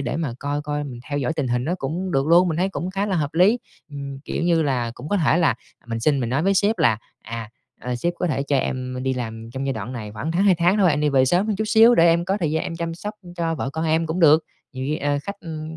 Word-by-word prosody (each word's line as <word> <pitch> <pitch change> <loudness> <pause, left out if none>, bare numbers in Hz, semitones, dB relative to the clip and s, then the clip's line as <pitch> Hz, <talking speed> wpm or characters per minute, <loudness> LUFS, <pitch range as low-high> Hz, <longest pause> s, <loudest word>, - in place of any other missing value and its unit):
để 130 - -2
mà 160 -6 -2
coi 145 +1 -2
coi 150 0 -3
mình 125 -4 -8
theo 145 - -1
dõi 140 +3 -1
tình 135 -5 -1
hình 125 +1 0
nó 170 +5 0
cũng 175 +7 -3
được 135 +1 +1
luôn, 175 +3 +5
mình 160 - -1
thấy 185 +3 +1
cũng 185 -1 -4
khá 195 +2 -1
là 195 -3 0
hợp 150 -2 -2
lý. 195 +8 +4 0.3
Ừm, 140 -1 -6
kiểu - - -3
như 170 -2 +3
là, 125 -5 0
cũng 125 +5 -8
có 205 - +1
thể 160 -3 +3
là 165 -9 +3 0.3
mình 115 -1 -3
xin, 140 +3 +2
mình 120 - -1
nói 135 +4 +1
với 195 +2 +2
sếp 200 +2 +2
là 120 -9 +3 0.2
"À, 115 -1 -6 0.3
ờ, 125 0 -3
sếp 170 +8 -1
có 180 - -1
thể 140 -5 0
cho 140 0 0
em 130 -1 -2
đi 130 0 0
làm 115 -2 -6
trong 135 +2 -4
giai 135 - 0
đoạn 110 +1 -5
này 110 -4 -6
khoảng 140 +10 -4
tháng, 175 +3 +2
2 195 -2 +5
tháng 175 +3 +2
thôi, 190 -5 +4
em 145 -1 +1
đi 150 - +2
về 135 -2 +4
sớm 175 +9 +2
hơn 215 -2 -1
chút 215 - -1
xíu 225 +2 +6
để 165 - +5
em 170 +1 +3
có 195 +2 0
thời 160 -4 0
gian 160 +1 0
em 165 - -4
chăm 165 0 -3
sóc 205 +5 -6 0.2
cho 165 -1 -1
vợ 135 -3 -3
con 160 +3 -3
em" 160 +1 +1
cũng 160 +3 -2
được. 160 -1 +6 0.3
Nhiều 130 -1 -5
khi, 150 - 0
ờ, 145 -1 0
khách, 200 +5 -7
ưm 160 -2 -7
155 Hz, 300 wpm, -22 LUFS, 130-175 Hz, 0.3 s, xíu